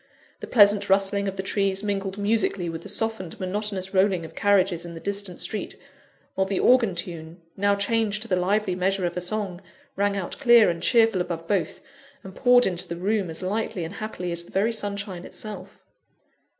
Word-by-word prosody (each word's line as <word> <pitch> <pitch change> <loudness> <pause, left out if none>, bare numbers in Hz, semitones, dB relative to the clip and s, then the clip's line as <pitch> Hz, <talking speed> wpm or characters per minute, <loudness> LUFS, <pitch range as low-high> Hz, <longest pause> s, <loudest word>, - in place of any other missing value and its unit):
The - - -7
pleasant 205 -3 +5
rustling 200 +1 +2
of 195 - -3
the 190 - -4
trees 195 0 0
mingled 195 -1 -2
musically 200 -4 0
with 165 0 -5
the - - -9
softened, 220 -6 -3
monotonous 190 0 -3
rolling 190 -3 +2
of - - -11
carriages 190 -4 +2
in 170 -1 -8
the - - -7
distant 200 -1 -2
street, 215 - -3 0.6
while 190 0 0
the 195 -1 -1
organ 235 -7 +4
tune, 170 -1 -7 0.2
now 200 +1 +2
changed 210 0 0
to - - -9
the 185 - +1
lively 185 +2 +1
measure 185 +1 0
of 175 - -2
a 180 - -2
song, 190 -1 -3 0.3
rang 200 0 +1
out 185 -3 -5
clear 235 -7 +6
and 170 -1 -6
cheerful 225 -2 +3
above 170 -2 -4
both, 190 -6 -1 0.4
and 190 - -10
poured 245 -1 +5
into 180 -1 -1
the 170 - -4
room 195 0 0
as 160 +3 -8
lightly 195 -2 -2
and 165 +4 -6
happily 205 -4 -5
as 170 0 -3
the - - -18
very 205 +4 +1
sunshine 200 -4 -4
itself. 215 +2 -8
195 Hz, 190 wpm, -25 LUFS, 180-210 Hz, 0.6 s, clear